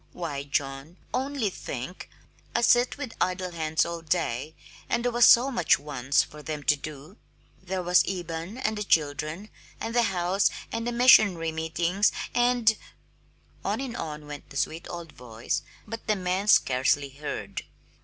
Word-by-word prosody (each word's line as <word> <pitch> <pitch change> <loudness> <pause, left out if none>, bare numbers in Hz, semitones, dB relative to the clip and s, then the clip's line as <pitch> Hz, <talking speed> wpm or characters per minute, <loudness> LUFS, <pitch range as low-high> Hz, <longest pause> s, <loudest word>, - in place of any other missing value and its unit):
Why, 145 -5 -4
John, 140 +3 -3 0.2
only 265 -6 -1
think, 135 +2 -7 0.5
I 235 - +3
sit 240 +2 +4
with 265 -5 -6
idle 185 0 0
hands 160 -2 0
all 170 0 -5
day, 155 -3 -2 0.3
and 235 - 0
there 245 - +2
was 240 0 +6
so 255 +4 +7
much 240 - +3
once 140 -1 +1
for 150 - -12
them 150 -1 -5
to 150 - +4
do. 150 - -10 0.4
There 185 0 -3
was 180 0 +5
Eben, 175 +2 -4
and 215 -5 -1
the - - -1
children, 155 +3 0 0.3
and 225 - -4
the 240 - +4
house, 185 +2 +2 0.2
and 230 +1 -3
the - - 0
missionary 215 -9 +5
meetings, 170 +5 +1 0.2
and 240 -2 +3 0.5
" - - -34
On - - -1
and 260 -3 -4
on 150 -7 -5
went 145 -1 -9
the 140 - -8
sweet 160 +5 -2
old 170 -2 -7
voice, 115 -2 -4 0.2
but 225 -1 -8
the 215 - +3
man 185 +1 -1
scarcely 135 -4 +3
heard. 145 +2 -5
175 Hz, 165 wpm, -27 LUFS, 150-220 Hz, 0.5 s, so